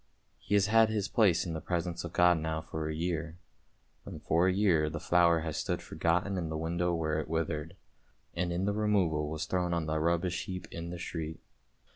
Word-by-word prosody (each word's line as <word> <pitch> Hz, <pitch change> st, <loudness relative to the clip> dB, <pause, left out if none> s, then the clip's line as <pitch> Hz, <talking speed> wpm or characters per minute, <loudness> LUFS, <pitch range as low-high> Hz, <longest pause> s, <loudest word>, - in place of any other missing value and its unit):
He 105 Hz, 0 st, -1 dB
has 100 Hz, -1 st, +4 dB
had 110 Hz, +1 st, +5 dB
his 105 Hz, -3 st, -1 dB
place 95 Hz, -7 st, +3 dB
in 85 Hz, -, -3 dB
the 80 Hz, -, -4 dB
presence 85 Hz, -1 st, -2 dB
of 85 Hz, -, -6 dB
God 90 Hz, -1 st, +4 dB
now 80 Hz, 0 st, -2 dB
for 80 Hz, 0 st, -5 dB
a 80 Hz, -, -3 dB
year, 85 Hz, 0 st, -3 dB, 0.7 s
and -, -, -8 dB
for 85 Hz, +3 st, +3 dB
a -, -, +4 dB
year 90 Hz, -6 st, +3 dB
the 80 Hz, +1 st, -5 dB
flower 85 Hz, 0 st, +3 dB
has 80 Hz, -2 st, -4 dB
stood -, -, -1 dB
forgotten 90 Hz, +3 st, 0 dB
in 85 Hz, -2 st, -3 dB
the 80 Hz, -, -3 dB
window 85 Hz, +2 st, -1 dB
where 80 Hz, -1 st, -1 dB
it 80 Hz, -, -5 dB
withered, 80 Hz, +1 st, -2 dB, 0.6 s
and 90 Hz, 0 st, -1 dB
in 90 Hz, +2 st, -1 dB
the 100 Hz, -, +1 dB
removal 95 Hz, -8 st, +1 dB
was 80 Hz, +1 st, -3 dB
thrown 90 Hz, -1 st, 0 dB
on 85 Hz, -, 0 dB
to 80 Hz, -, -4 dB
the 80 Hz, -, +1 dB
rubbish 85 Hz, +2 st, 0 dB
heap 90 Hz, -1 st, -6 dB
in 85 Hz, 0 st, -6 dB
the 90 Hz, -, -5 dB
street. 80 Hz, -2 st, -5 dB
85 Hz, 215 wpm, -31 LUFS, 80-90 Hz, 0.7 s, had